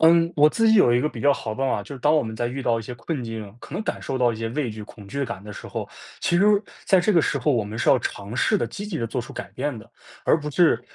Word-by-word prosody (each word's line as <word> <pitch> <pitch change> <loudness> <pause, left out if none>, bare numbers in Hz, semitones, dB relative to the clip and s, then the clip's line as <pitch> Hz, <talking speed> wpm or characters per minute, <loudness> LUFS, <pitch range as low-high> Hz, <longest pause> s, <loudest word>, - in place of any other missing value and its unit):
嗯， 165 +1 +5
我 150 0 +7
自 225 +7 +2
己 220 - +6
有 125 - +6
一 120 - +3
个 150 - +1
比 - - -8
较 145 0 +5
好 115 - -4
的 110 - -5
办 135 0 0
法， 105 - 0
就 140 - -10
是 - - -9
当 150 +4 +4
我 155 - +3
们 110 -1 -6
在 120 +1 -1
遇 135 +3 -4
到 115 -2 +2
一 - - -5
些 125 - -7
困 125 +4 -4
境， 110 -3 -6
可 - - -10
能 - - -2
感 - - -3
受 135 - -3
到 125 -2 +3
一 - - -6
些 115 0 -3
畏 130 -2 -2
惧 110 - -8
恐 105 -2 -13
惧 140 +7 -2
感 110 -5 -6
的 105 0 -9
时 - - -9
候， - - -5 0.3
其 175 - +2
实 195 - +4 0.4
在 190 - +5
这 210 +4 +2
个 170 - +5
时 - - 0
候， 150 - +1
我 115 -4 +1
们 105 +2 -7
是 - - +3
要 130 - +5
尝 100 -1 -5
试 210 - +3
地 - - 0
积 205 +1 -6
极 200 -5 -4
地 115 - -1
做 125 +2 -2
出 - - -9
改 - - -7
变 145 -3 -2
的， 105 - -12 0.3
而 160 - +4
不 150 - -5
是 170 +2 +4
130 Hz, 355 characters per minute, -24 LUFS, 115-160 Hz, 0.4 s, 我